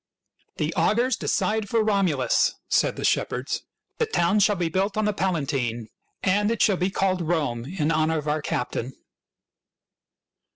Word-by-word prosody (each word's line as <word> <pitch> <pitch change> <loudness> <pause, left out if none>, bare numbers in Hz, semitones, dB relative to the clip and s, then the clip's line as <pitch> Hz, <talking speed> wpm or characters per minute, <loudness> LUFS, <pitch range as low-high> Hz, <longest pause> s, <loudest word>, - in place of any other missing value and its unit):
" - - -43
The - - -1
augurs 245 +4 +2
decide 215 -2 -1
for 225 0 +2
Romulus," 190 -11 +2
said - - +2
the - - -3
shepherds. - - 0 0.2
" - - -55
The 460 - +1
town 195 - +2
shall 205 +1 +4
be 175 -2 -1
built 195 +5 -1
on 215 - +1
the 210 - +1
Pala 185 -7 0
tine, 120 -5 -2 0.3
and 205 +2 +2
it 230 - -1
shall 200 -4 +3
be 180 +2 0
called 190 -1 0
Rome 145 -9 -1
in 160 0 -1
honor 160 0 +1
of 150 0 -4
our 150 +1 0
captain." 125 -2 -3
185 Hz, 170 wpm, -25 LUFS, 150-205 Hz, 0.3 s, shall